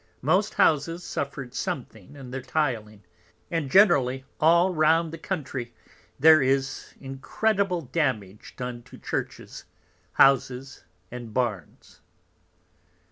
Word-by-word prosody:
Most 185 +9 +2
Houses 165 +3 +2
suffered 135 -5 -5
something 115 -3 -5
in 135 -3 -10
their 135 +1 -4
Tiling, 115 -9 -2 0.5
and 165 -5 -1
generally 135 -9 +4
all 170 +4 +4
round 160 +1 +2
the 165 - -7
Country, 140 -10 -5 0.4
there 155 +2 +7
is 135 0 -1
incredible 180 +8 -1
Damage 125 - -3
done 125 -1 -5
to - - -15
Churches, - - -5 0.5
Houses, 135 0 +2 0.3
and 120 -3 -8
Barns. 115 -8 -4
135 Hz, 105 wpm, -26 LUFS, 125-165 Hz, 0.5 s, there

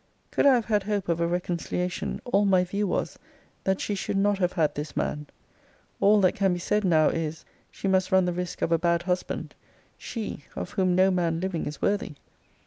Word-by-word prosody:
Could - - +3
I 270 - +7
have 235 -3 0
had 210 -2 +2
hope 200 -2 -2
of 170 -1 +1
a 170 - +1
reconciliation, 175 +1 -2
all 205 -4 +2
my 190 -2 +4
view 200 +3 -2
was, - - -2 0.5
that 190 0 +1
she 210 - -2
should 195 0 -2
not 200 0 +2
have 180 -1 +1
had 160 -5 +1
this 145 0 -6
man. 150 0 -2 0.7
All 210 +1 +5
that 185 - +4
can 195 -2 +1
be - - -2
said 210 +4 0
now, 160 -5 +4
is, 160 -1 -3 0.2
she - - -5
must 190 0 +2
run 190 -1 +4
the 180 - 0
risk 180 0 -4
of - - 0
a 165 - +3
bad 170 0 +1
husband: 180 0 -3 0.5
she 215 - -5
of - - -5
whom 185 -3 +1
no 190 +1 +4
man 170 -3 0
living 185 -2 -2
is 145 -1 -7
worthy! 200 -6 0
185 Hz, 210 wpm, -26 LUFS, 170-200 Hz, 0.7 s, I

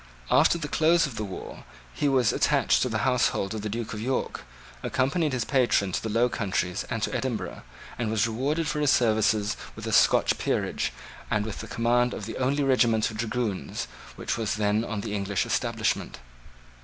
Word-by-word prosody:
After 145 +6 +5
the 155 -3 -4
close 165 +3 +3
of 135 -5 -6
the 110 - -3
war 95 -3 -8 0.3
he 145 - +1
was 130 -4 +3
attached - - +3
to 125 - +1
the 110 -3 -1
household 125 -5 +1
of 110 - -4
the 105 - -3
Duke 115 +1 -4
of 105 - -5
York, 130 +3 -2 0.4
accompanied 145 +4 0
his 130 -3 -1
patron 120 -8 +2
to - - -1
the 110 - -4
Low 115 +3 +3
Countries 95 -4 -2
and 115 -3 -2
to - - -1
Edinburgh, 125 -4 -3 0.4
and 115 -3 -1
was 110 -1 +2
rewarded 140 +8 -1
for 150 - -1
his 145 -1 +2
services 110 -3 +2 0.2
with - - -8
a - - -3
Scotch - - +4
peerage - - -1 0.4
and 105 -1 +1
with 110 - -5
the - - -6
command 120 +1 +1
of 105 - -6
the 110 - -6
only 140 +3 +1
regiment 120 -5 +3
of 110 - -8
dragoons 110 -3 -2 0.3
which - - -3
was 110 -2 -1
then 105 +1 +1
on 110 -3 -3
the 105 0 -4
English 100 -2 -1
establishment. - - -1
115 Hz, 190 wpm, -26 LUFS, 105-130 Hz, 0.4 s, After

